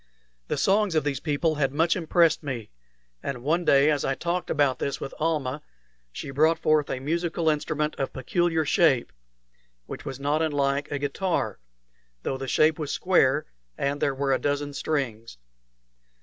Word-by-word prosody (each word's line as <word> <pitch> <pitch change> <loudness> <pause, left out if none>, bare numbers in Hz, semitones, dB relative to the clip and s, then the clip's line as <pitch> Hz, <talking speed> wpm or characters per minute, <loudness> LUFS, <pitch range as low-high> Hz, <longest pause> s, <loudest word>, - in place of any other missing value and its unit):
The - - -1
songs 200 -2 +2
of 155 - +3
these 140 -3 -1
people 155 +1 0
had 135 -1 +2
much 165 +4 +2
impressed 170 -2 +3
me; 130 -8 -5 0.5
and 125 -3 -5
one 165 +5 +1
day, 140 -1 +5
as 145 -2 0
I 135 - 0
talked 175 +3 -2
about 140 -4 +2
this 140 - -2
with 135 - -6
Almah, 150 -3 -1 0.5
she 135 - -6
brought 155 +4 +3
forth 155 -2 +2
a 130 - -2
musical 165 +3 0
instrument 150 0 -1
of 135 - -1
peculiar 165 +4 0
shape, 140 - +3 0.7
which - - -8
was 135 - -6
not 145 +3 0
unlike 145 -2 0
a 145 - -1
guitar, 145 +6 -2 0.6
though - - -1
the 135 - -5
shape 155 +3 +3
was 150 -2 -3
square 150 -6 +2 0.3
and 140 +1 -1
there 140 - +1
were 135 0 +1
a - - +1
dozen 145 0 -1
strings. 120 - -3
145 Hz, 165 wpm, -26 LUFS, 135-160 Hz, 0.7 s, day